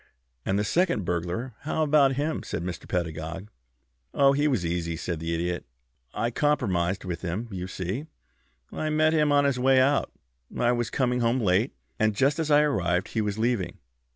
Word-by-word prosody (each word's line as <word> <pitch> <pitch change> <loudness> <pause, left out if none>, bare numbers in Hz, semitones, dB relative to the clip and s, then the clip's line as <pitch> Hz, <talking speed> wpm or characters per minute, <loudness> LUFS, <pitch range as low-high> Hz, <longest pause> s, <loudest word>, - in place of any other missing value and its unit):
"And 95 - +1
the 105 - +1
second 165 - +1
burglar. 90 +9 -2
How 155 +1 -1
about 145 -2 +4
him?" 150 +4 -1
asked - - -5
Mr. 85 +1 -5
Pedagog. 85 +3 -3 0.6
"Oh, 140 -1 +5
he 145 +2 +2
was 125 -12 0
easy," 85 -1 -2
said 85 0 -4
the 80 +1 -3
Idiot. 85 +1 -2 0.5
"I 115 - -1
compromised 95 -12 0
with 85 -2 -4
him. 95 +6 -3
You 90 -1 -4
see, 95 - -4 0.6
I 155 - -2
met 155 +1 +3
him 150 -2 +3
on 145 0 +4
his 135 -3 +1
way 130 +1 +4
out. 140 +2 +2 0.5
I 120 0 +3
was 120 -2 -1
coming 125 -2 0
home 120 +2 +2
late, 105 +3 +1 0.2
and 110 -1 +2
just 140 +7 +2
as 160 -2 -1
I 145 0 +6
arrived 95 - 0
he 110 - -1
was 105 -1 -2
leaving. 110 -7 -1
115 Hz, 180 wpm, -26 LUFS, 90-140 Hz, 0.6 s, I